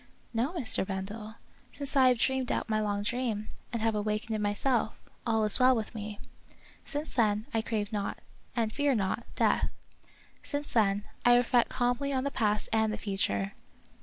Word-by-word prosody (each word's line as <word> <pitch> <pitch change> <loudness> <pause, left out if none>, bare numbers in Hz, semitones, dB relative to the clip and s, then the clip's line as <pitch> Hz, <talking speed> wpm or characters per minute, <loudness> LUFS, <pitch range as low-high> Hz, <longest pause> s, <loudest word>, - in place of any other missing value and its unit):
" - - -34
No, 235 +6 +1
Mr. 285 -11 +2
Bendel, 210 +3 -5 0.4
since 285 0 -4
I 265 -2 +7
have 250 -1 +4
dreamed 265 +2 +1
out - - -1
my 215 -1 +1
long 205 -1 -1
dream, 220 -2 -1 0.2
and 230 -2 -2
have 225 0 +2
awakened 215 +2 -1
in 215 - -2
myself, 215 +3 +1 0.3
all 225 -1 +2
is 210 +3 +4
well 255 0 +6
with 220 0 -3
me; 210 -2 -6 0.6
since 295 +1 -4
then, 215 -3 +2
I 225 - +2
crave 220 -2 -2
not, 205 -1 -2 0.4
and 225 -3 0
fear 285 -2 +2
not, 210 +2 -1
death. - - +2 0.7
Since 290 0 -3
then, 205 -3 +2 0.2
I 245 0 +7
reflect 245 0 +3
calmly 245 +3 0
on 260 -1 0
the 280 - -1
past 210 -5 +1
and 220 -1 +3
the 215 - -3
future. 100 - -1
220 Hz, 180 wpm, -30 LUFS, 210-250 Hz, 0.7 s, I